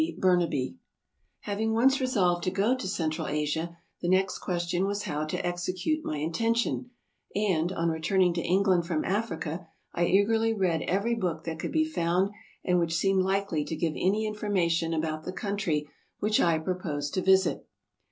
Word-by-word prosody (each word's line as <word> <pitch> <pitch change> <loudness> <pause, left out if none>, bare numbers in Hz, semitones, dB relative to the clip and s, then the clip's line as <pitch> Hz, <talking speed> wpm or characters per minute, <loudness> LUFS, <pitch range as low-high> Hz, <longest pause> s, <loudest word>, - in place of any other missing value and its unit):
BURNABY 165 - +1 0.6
HAVING 220 +2 -1
once 265 +4 +4
resolved 185 -9 +2
to - - +2
go 205 +7 +2
to 255 -7 -5
Central 160 -5 -2
Asia, 150 +3 -2 0.2
the 175 - -1
next 190 +1 +2
question 175 +1 -1
was 205 +1 -2
how 150 +1 -2
to 155 - -3
execute 185 - -1
my 155 - -3
intention; 230 +11 0 0.5
and, 185 -5 +1
on 170 -2 0
returning 175 +3 +2
to 170 - -1
England 185 -1 +2
from 160 -3 -1
Africa, 175 -5 -2 0.3
I 175 0 +1
eagerly 225 +3 +3
read 180 -5 +1
every 200 +6 +1
book 175 -8 -2
that 160 -1 -5
could - - -3
be 315 0 +2
found 185 - +1 0.3
and 180 -1 +3
which 165 -1 0
seemed 195 +2 +3
likely 190 -4 0
to 160 - -4
give 160 0 -1
any 205 +4 +1
in 215 - -2
formation 175 -6 0
about 155 0 -2
the 185 - -4
country 190 -8 -1 0.3
which 210 +1 +1
I 170 -2 +3
proposed 155 -4 -3
to 185 - 0
visit. 190 +1 +3
180 Hz, 170 wpm, -28 LUFS, 165-200 Hz, 0.6 s, once